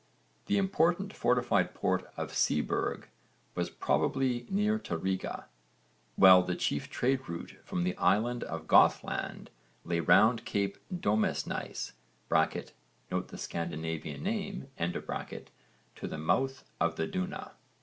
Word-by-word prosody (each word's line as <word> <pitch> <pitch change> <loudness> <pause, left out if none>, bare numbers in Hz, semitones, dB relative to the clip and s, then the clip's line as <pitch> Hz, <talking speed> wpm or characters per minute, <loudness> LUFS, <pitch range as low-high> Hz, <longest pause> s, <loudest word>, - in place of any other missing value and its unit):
The 205 - +2
important 190 0 +2
fortified 125 0 +2
port - - 0
of - - -3
Seeburg 75 - 0 0.5
was - - -1
probably 125 -3 0
near 210 +2 +2
to 85 - -3
Riga, 95 +2 -3 0.7
while 95 -1 +9
the 90 0 -2
chief 70 - -1
trade 130 +1 0
route 85 0 -6
from 90 - -2
the 90 0 0
island 120 +3 +2
of - - -5
Gothland - - +3 0.3
lay 85 -1 0
round 110 +7 +5
cape 100 -3 -1
Domesnæes 110 - -1 1.2
(note - - -1
the - - -9
Scandinavian 80 - -4
name) 200 -6 -3
to 85 +1 -6
the - - -5
mouth 135 - 0 0.2
of 85 -1 +1
the 80 - -1
Duna. 90 -1 -4
110 Hz, 120 wpm, -31 LUFS, 85-140 Hz, 1.2 s, while